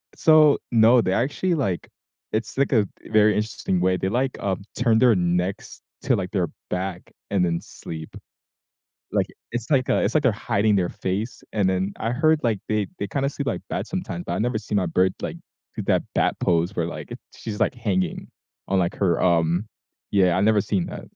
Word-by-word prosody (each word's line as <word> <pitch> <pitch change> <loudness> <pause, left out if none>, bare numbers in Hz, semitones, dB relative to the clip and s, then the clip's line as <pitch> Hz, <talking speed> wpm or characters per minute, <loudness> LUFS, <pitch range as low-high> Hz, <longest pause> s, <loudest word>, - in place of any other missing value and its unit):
so 155 -2 +6
No, 115 +1 +6
they 95 - 0
actually, 145 - 0
like 100 - -1 0.5
it's, 115 +4 -2
like 140 0 +2
a 105 -6 +3 0.2
very 105 -1 +4
interesting 105 -4 -1
way, 95 0 +2
they, 95 - -1
like, 130 +4 -1
um, 95 -1 -2 0.2
turn 115 -2 +3
their 120 -4 +5
necks 90 +2 -1 0.2
to, - - +3
like, - - -3
their - - 0 0.2
back 90 -1 -4 0.2
and 100 -3 +2
then 85 -1 +1
sleep. 80 -1 -9 1.0
Like - - +2 0.3
it's 120 +3 -4
like 130 -3 +2
a - - +3
it's - - 0
like 150 -3 +2
they're 125 - +4
hiding 105 +1 +3
their 90 -3 +2
face, 105 +6 -3
and 100 -3 +2
then 95 +2 -1
I 115 - -1
heard, 155 +4 +3
like, 115 -4 +1
they 105 -3 0
they 100 - -2
kinda 135 +7 -1
sleep 140 -1 -5
like - - -1
bats, - - -3
sometimes, 180 -1 -4
but - - -2
I - - -1
never 120 -1 0
see 105 - -6
my 95 -3 +2
bird, 90 +3 +2
like, - - -4 0.4
do - - -2
that - - +2
bat - - +2
pose 85 +3 +1
where, 85 - 0
like, 85 - -7
it - - -7 0.2
she's, 105 -2 -6
like, - - +2
hanging 95 -7 -1 0.4
on, 95 - +2
like, 85 - 0
her, 90 -4 +1
um 85 +2 +2 0.4
yeah, 90 -3 +3
I've 95 - +2
never 110 -1 +4
seen 95 -2 -1
that. - - -7
105 Hz, 205 wpm, -24 LUFS, 90-120 Hz, 1.0 s, so